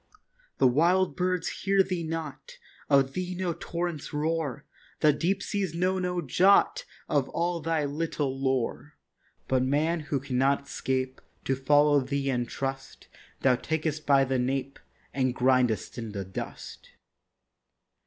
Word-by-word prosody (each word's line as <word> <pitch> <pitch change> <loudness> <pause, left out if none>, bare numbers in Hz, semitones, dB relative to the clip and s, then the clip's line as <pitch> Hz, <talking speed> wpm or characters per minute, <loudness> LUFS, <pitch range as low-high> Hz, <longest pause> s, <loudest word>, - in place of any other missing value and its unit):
The - - +3
wild 175 +8 +3
birds 180 -2 0
heed 195 -1 +3
thee 180 -2 -1
not; 160 -2 -6 0.3
Of 135 -1 +4
thee 180 0 -3
no 180 -1 -1
torrents 170 -2 -4
roar; 155 -2 -2 0.4
The 150 -1 +5
deep 180 +6 0
seas 190 -5 -2
know 185 +2 +1
no 180 -1 -1
jot 195 - +4 0.2
Of - - +1
all 170 0 -1
thy 160 -1 0
little 145 -2 -2
lore; 135 +2 -2 0.5
But 130 -1 +2
man 150 +6 +1
who 145 -2 -2
cannot 140 +1 0
'scape 130 0 -2 0.2
To 135 - +1
follow 145 +2 +4
thee 135 +1 -1
and 120 -2 -1
trust, 135 0 -5 0.3
Thou 130 -1 +4
takest 155 +2 -2
by 140 -1 +5
the 130 -1 0
nape 135 +2 -2 0.3
And 130 -2 0
grindest 125 -4 +1
in 115 -3 -6
the 100 -2 -4
dust. 95 - -8
145 Hz, 140 wpm, -28 LUFS, 130-170 Hz, 0.5 s, The